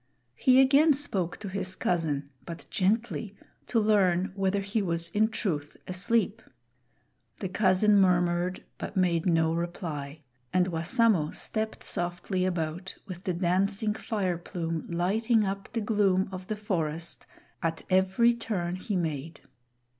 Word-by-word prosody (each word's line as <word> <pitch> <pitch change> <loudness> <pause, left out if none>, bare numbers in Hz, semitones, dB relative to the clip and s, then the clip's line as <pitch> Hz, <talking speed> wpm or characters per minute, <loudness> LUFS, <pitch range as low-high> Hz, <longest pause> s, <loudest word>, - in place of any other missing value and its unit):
He 255 - +4
again 280 +4 +6
spoke 195 - -2
to 210 - -5
his 185 -1 -2
cousin, 150 -5 -1
but 170 -1 -8
gently, 210 +1 0 0.3
to 230 - +2
learn 195 -3 +3
whether 195 0 0
he 200 +3 -1
was 170 -3 0
in 210 +5 +2
truth 165 -10 -2
asleep. 205 +3 0 1.0
The 195 - -3
cousin 200 +1 +4
murmured, 180 -1 +2 0.2
but 200 - -5
made 175 -2 +2
no 165 -2 +3
reply; 160 -4 -4 0.3
and 185 0 +2
Wassamo 175 0 +2
stepped 220 0 -3
softly 180 +2 -2
about 175 +1 -3
with 185 -3 -9
the 185 - 0
dancing 195 +4 +1
fire 190 -6 -2
plume 165 -2 -4
lighting 210 +6 +2
up 195 +1 -4
the 230 - -2
gloom 200 -3 +2
of 185 0 -7
the 215 - -2
forest 170 -6 -3 0.3
at 165 -2 -2
every 190 +5 +4
turn 190 -7 -3
he 200 +2 -3
made. 160 -2 -3
185 Hz, 135 wpm, -28 LUFS, 170-210 Hz, 1.0 s, again